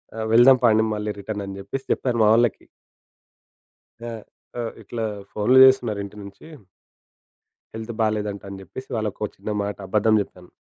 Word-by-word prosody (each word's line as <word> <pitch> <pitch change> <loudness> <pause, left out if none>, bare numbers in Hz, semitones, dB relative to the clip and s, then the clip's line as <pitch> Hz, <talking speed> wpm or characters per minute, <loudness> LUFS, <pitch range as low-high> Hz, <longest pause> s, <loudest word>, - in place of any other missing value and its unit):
ఆహ్, 110 0 -3
"వెళ్దాం 125 +3 +7
పాండి 110 -1 +4
మళ్ళి 105 0 -3
రిటర్న్" 100 0 -5
అని 95 0 -7
జెప్పేసి 130 +8 -6
జెప్పాను 120 -3 0
మా 105 - +5
వాళ్ళకి. 115 -2 +1 1.3
ఆ! 120 0 -6 0.5
అ - - -2 0.2
ఇట్ల 115 +3 -8 0.3
ఫోనులు 115 +5 +3
జేస్తున్నారు 125 -6 +3
ఇంటి 100 +1 -11
నుంచి. 100 +6 -12 1.3
హెల్త్ 110 +1 -6
బాలేదంట 105 -2 -1
అని 100 -1 -8
జెప్పేసి 130 +9 -10
వాళ్ళకో 105 -1 -3
చిన్నమాట 105 -1 -3
అబద్ధం 110 +2 +3
జెప్పాను. 90 -2 -15
110 Hz, 140 wpm, -23 LUFS, 100-120 Hz, 1.3 s, వెళ్దాం